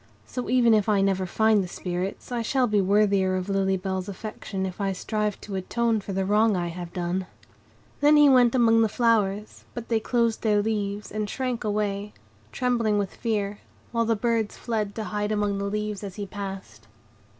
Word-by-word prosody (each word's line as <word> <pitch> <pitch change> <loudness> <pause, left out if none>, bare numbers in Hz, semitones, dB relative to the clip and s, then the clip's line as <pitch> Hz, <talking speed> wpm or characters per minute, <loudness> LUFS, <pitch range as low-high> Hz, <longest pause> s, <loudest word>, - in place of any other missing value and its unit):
So, 250 -1 -5
even 240 -2 +4
if 215 0 +2
I 205 -2 +3
never 190 -1 +1
find 220 +2 +3
the - - -5
Spirits, 180 +5 -4
I 240 -1 -1
shall 255 +3 +1
be 210 -3 +2
worthier 195 -1 +3
of 185 +1 -3
Lily 195 -1 +1
Bell's 190 0 -3
affection 195 -1 -5
if 190 +2 -6
I 195 -1 0
strive 210 +2 -2
to 205 - -8
atone 220 +4 0
for 200 - -7
the 190 0 -1
wrong 210 +2 +3
I 175 -1 -2
have 175 0 -7
done." 180 +1 -2 0.7
Then 295 +1 +5
he 295 0 +7
went 250 -3 +5
among 225 -2 +5
the 220 - +3
flowers, 210 -3 0
but 240 -1 -6
they 225 -1 +2
closed 230 0 0
their 210 -2 +2
leaves, 205 -1 -2
and 215 0 -3
shrank 255 -1 -2
away, 210 -1 -2 0.4
trembling 235 - +1
with 200 -2 -2
fear; 210 -3 -2 0.3
while 230 -1 +1
the 225 0 +2
birds 225 -1 -1
fled 215 -4 -2
to 220 - -3
hide 210 0 -2
among 205 -1 0
the 200 - -2
leaves 210 0 -3
as 195 -2 -6
he 205 - -4
passed. 190 - -8
210 Hz, 195 wpm, -25 LUFS, 195-225 Hz, 0.7 s, he